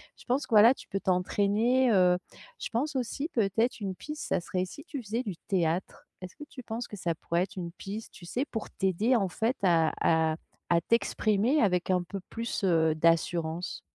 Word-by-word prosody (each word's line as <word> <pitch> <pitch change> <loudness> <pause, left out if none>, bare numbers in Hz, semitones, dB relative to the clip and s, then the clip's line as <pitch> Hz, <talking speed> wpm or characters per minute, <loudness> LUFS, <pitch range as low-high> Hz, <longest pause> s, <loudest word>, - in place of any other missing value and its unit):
je - - -17
pense 260 +3 +1
que, - - -6
voilà, 220 +4 +8
tu - - -13
peux 195 - -2
t'entraîner, 205 +7 +2
heu, 180 -3 +5 0.4
je - - -4
pense 275 +5 -1
aussi 265 +5 -2
peut-être 225 - +1
une 190 -2 -3
piste, 300 +7 -7
ça - - +1
serait 185 +1 -2
si 280 +10 -11
tu 285 -6 -5
faisais 230 +3 -3
du 195 -5 -4
théâtre? 175 -1 -1 0.2
Est-ce 185 0 -9
que 295 - -9
tu 255 - -10
penses 230 +1 -5
que 210 - -8
ça 175 -2 -1
pourrait 170 +2 0
être 190 - -8
une 170 -2 -4
piste, 205 +4 -7
tu 175 - -13
sais? 245 +9 -1
Pour 225 - -5
t'aider, 195 +6 +1
en 195 -5 +1
fait, 225 +8 0
à 165 -4 +4
à 160 -1 +3 0.3
à 170 -1 +4
t'exprimer 230 - +2
avec 180 -4 +1
un 180 -1 +3
peu 195 +3 -6
plus, 230 -2 -4
heu, 160 -4 +3
d'assurance. 165 +1 +1
195 Hz, 200 wpm, -29 LUFS, 175-235 Hz, 0.4 s, voilà